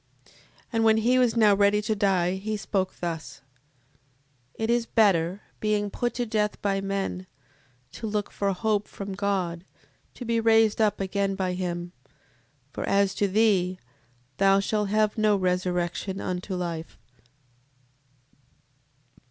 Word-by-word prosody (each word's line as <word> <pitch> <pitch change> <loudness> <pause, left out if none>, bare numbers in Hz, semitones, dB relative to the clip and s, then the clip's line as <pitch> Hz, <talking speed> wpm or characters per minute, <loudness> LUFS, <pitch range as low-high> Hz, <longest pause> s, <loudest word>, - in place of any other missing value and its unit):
7:14. - - -24 0.4
And 225 0 +2
when 220 0 +5
he 245 +3 +3
was 240 -2 +2
now 215 -3 +6
ready 200 +1 +3
to 215 +1 0
die, 190 -4 +2
he 215 +2 -3
spoke 190 -2 -2
thus: 160 -7 -5 1.1
It 225 +1 -1
is 235 -1 +1
better, 190 -3 +2 0.2
being 210 -1 0
put 240 +2 -2
to 245 - -1
death 215 -2 -1
by 195 -1 0
men, 195 -1 -3 0.6
to 225 - -6
look 210 -1 -2
for 200 -1 -1
hope 210 +2 0
from 200 -1 -7
God, 190 -4 -2 0.5
to 245 - -7
be 230 0 +1
raised 225 -1 +4
up 210 -1 +2
again 195 0 -1
by 185 -2 -1
him; 175 -1 -4 0.8
for, - - -5
as 200 -1 +3
to 205 - +1
thee, 190 -3 +2 0.6
thou 195 +2 +4
shalt 210 0 -1
have 215 +1 +1
no 215 -1 +4
resurrection 180 0 -1
unto 185 +1 -3
life. 170 -2 -5
200 Hz, 140 wpm, -26 LUFS, 185-215 Hz, 1.1 s, now